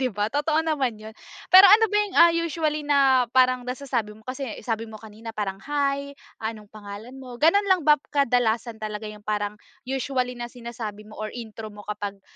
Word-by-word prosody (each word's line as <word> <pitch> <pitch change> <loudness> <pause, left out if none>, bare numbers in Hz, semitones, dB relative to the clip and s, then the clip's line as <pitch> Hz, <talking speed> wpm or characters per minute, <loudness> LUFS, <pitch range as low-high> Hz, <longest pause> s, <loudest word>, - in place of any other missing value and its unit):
di 260 - +1
ba, 210 -2 -2
totoo 305 +3 +1
naman 280 -7 0
'yon. 220 - -8 0.4
Pero 380 +2 +10
ano 440 0 +6
ba 415 - +1
yung, 415 -2 -1
ah, 340 - +7
usually 320 -3 -1
na 270 -3 +4
parang 255 -1 +3
nasasabi 250 -5 -3
mo 220 - -18
kasi 260 +3 -5 0.2
sabi 225 0 -3
mo 220 - -11
kanina 220 +1 -10
parang 195 -2 -3
"Hi, 280 -1 -1 0.2
anong 220 -2 -6
pangalan 215 +5 -10
mo?" 255 -2 -9
Gano'n 400 +6 +4
lang 375 -4 +3
bap 300 0 +5
kadalasan 235 -4 0
talaga 215 0 -5
yung 210 0 -14
parang 210 0 -2 0.2
usually 255 -1 -2
na 240 - -4
sinasabi 235 -3 -7
mo 215 0 -14
or 215 +1 -5
intro 220 -2 -8
mo 205 - -11
kapag, 205 -1 -6
245 Hz, 190 wpm, -24 LUFS, 215-280 Hz, 0.4 s, Pero